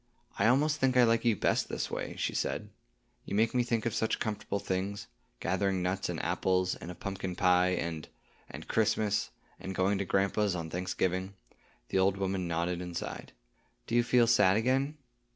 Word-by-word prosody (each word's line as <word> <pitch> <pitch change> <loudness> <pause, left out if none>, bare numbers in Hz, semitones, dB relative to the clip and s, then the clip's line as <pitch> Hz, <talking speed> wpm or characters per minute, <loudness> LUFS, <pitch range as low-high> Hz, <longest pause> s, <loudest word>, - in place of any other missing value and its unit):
"I 100 - +4
almost 145 +5 +3
think 130 -2 +2
I 125 - +7
like 115 0 +2
you 115 -2 +4
best - - +1
this - - -3
way," - - -4
she - - -2
said. - - -2 0.5
"You - - -4
make 110 +2 +2
me 125 - +3
think 120 -2 -1
of 115 - 0
such 110 - 0
comfortable 105 -2 -3
things,—gathering 95 -1 -3
nuts 95 +2 -1
and - - -3
apples, 95 -1 +1
and - - -8
of 90 - -9
pumpkin 95 -2 -4
pie, 90 0 +3
and—and—Christmas, 105 +6 -2 0.3
and 95 0 -6
going 95 +2 +1
to 100 - -1
grandpa's 100 +1 +1
on 80 -2 -5
Thanksgiving." 95 +1 -2 0.5
The 95 - +1
old 95 +1 +3
woman 95 -2 -1
nodded 85 +1 -1
and 90 -1 -5
sighed. - - -6 0.5
"Do - - -7
you 120 - +5
feel 120 0 +4
sad 105 -5 +4
again?" 135 +6 +1
100 Hz, 170 wpm, -30 LUFS, 90-115 Hz, 0.5 s, I